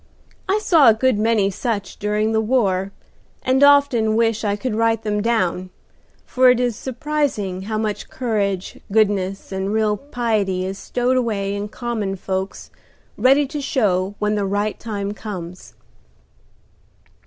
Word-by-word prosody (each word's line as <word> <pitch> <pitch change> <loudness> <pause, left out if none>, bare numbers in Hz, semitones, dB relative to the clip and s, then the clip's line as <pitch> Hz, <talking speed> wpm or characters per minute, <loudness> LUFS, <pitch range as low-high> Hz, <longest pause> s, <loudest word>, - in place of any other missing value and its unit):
I 395 - +3
saw 330 - +5
a 220 - +5
good 255 -1 +1
many 215 -3 +2
such 205 -1 -3
during 210 +1 0
the 220 0 +2
war, 200 -5 +1 0.5
and 260 +2 +3
often 280 -6 +4
wish 225 -1 +1
I 205 -1 0
could 225 +3 -3
write 225 0 +1
them 210 -1 -1
down, 185 -5 0 0.6
for 255 0 +4
it 250 -1 +4
is 245 -2 0
surprising 255 -8 -2
how 215 - -1
much 215 -1 -3
courage, 200 -6 -2
goodness 195 -3 +1
and 190 +1 -2
real 215 -1 +1
piety 215 -9 -1
is 190 +1 -5
stowed 250 +1 0
away 205 -5 -1
in 205 +1 -3
common 215 -3 -3
folks 190 0 -4 0.4
ready 275 +3 +4
to 290 +2 -5
show 200 -8 0
when 210 0 0
the 205 -2 -1
right 205 +2 -1
time 205 -3 -4
comes." 185 -4 -8
215 Hz, 145 wpm, -21 LUFS, 200-245 Hz, 0.6 s, saw